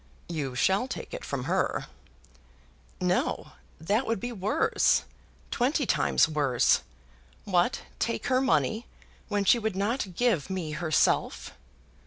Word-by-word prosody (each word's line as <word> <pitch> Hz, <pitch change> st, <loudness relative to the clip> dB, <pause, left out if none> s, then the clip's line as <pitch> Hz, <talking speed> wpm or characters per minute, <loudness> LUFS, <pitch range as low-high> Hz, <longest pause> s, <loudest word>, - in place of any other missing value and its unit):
"You 145 Hz, -7 st, -3 dB
shall 195 Hz, -, +2 dB
take -, -, -7 dB
it -, -, -6 dB
from 135 Hz, -3 st, -3 dB
her!" -, -, 0 dB, 1.1 s
"No; -, -, 0 dB, 0.3 s
that 205 Hz, +10 st, 0 dB
would 230 Hz, -2 st, 0 dB
be 245 Hz, +5 st, -4 dB
worse; 205 Hz, -2 st, +2 dB, 0.5 s
twenty 275 Hz, +4 st, +1 dB
times -, -, +3 dB
worse. 145 Hz, -6 st, +2 dB, 0.6 s
What! 180 Hz, +4 st, +1 dB, 0.2 s
take 230 Hz, -, -1 dB
her 255 Hz, -1 st, +2 dB
money, 240 Hz, -3 st, +1 dB, 0.4 s
when 205 Hz, -1 st, 0 dB
she 195 Hz, +5 st, +5 dB
would 220 Hz, -3 st, -2 dB
not 200 Hz, -1 st, -1 dB
give 215 Hz, -, +1 dB
me 180 Hz, -5 st, -3 dB
herself!" 155 Hz, -1 st, +1 dB
195 Hz, 125 wpm, -28 LUFS, 160-235 Hz, 1.1 s, she